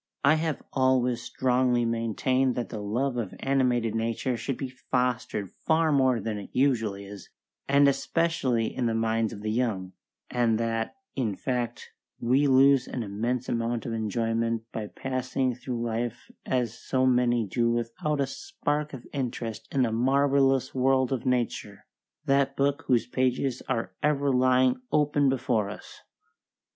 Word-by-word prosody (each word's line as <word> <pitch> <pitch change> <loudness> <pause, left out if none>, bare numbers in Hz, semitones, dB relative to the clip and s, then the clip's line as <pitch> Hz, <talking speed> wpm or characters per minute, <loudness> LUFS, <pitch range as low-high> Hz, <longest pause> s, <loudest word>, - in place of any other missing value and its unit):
I 140 +2 +6
have 160 -1 -1
always 130 -2 +2
strongly 125 -1 +1
maintained 115 +3 0
that 120 - -3
the 110 -3 -5
love 120 +5 -1
of 110 -6 -3
animated 125 -4 +1
nature 115 +3 -1
should 125 +3 -3
be 135 - -3 0.2
fostered 125 -6 0
far 160 0 +1
more 130 -4 +3
than 110 -2 -3
it 100 - -9
usually 115 -7 +1
is, 100 -1 -10 0.4
and 140 +1 +5
especially 140 -5 0
in 125 - 0
the 115 - 0
minds 115 0 +1
of 105 -2 -9
the 110 - -1
young; 105 -6 -1 0.4
and 120 -2 +2
that, 115 - -2 0.2
in 115 -7 -1
fact, 125 0 -3 0.3
we 130 +5 +3
lose 135 0 +5
an 125 - -4
immense 115 +5 -2
amount 115 0 -1
of 115 - -3
enjoyment 115 +1 -1
by 110 -2 -4
passing 130 +1 -2
through 125 -1 -4
life 120 +1 -3 0.2
as 125 -3 0
so 130 0 0
many 120 -2 +3
do 115 +4 0
without 120 +6 -1
a 140 - +2
spark 150 - -3
of 125 -3 -8
interest 120 -5 -4
in 135 -2 +2
the 115 - +1
marvellous 135 +2 +2
world 130 0 +2
of 130 0 -3
nature, 120 -5 -2 0.4
that 140 -1 +2
book 140 +1 +1
whose 125 -3 +3
pages 130 0 0
are 115 -7 -1
ever 145 -2 +2
lying 130 - +3
open 145 -2 +3
before 125 -6 0
us. 105 - -10
125 Hz, 150 wpm, -27 LUFS, 115-135 Hz, 0.4 s, I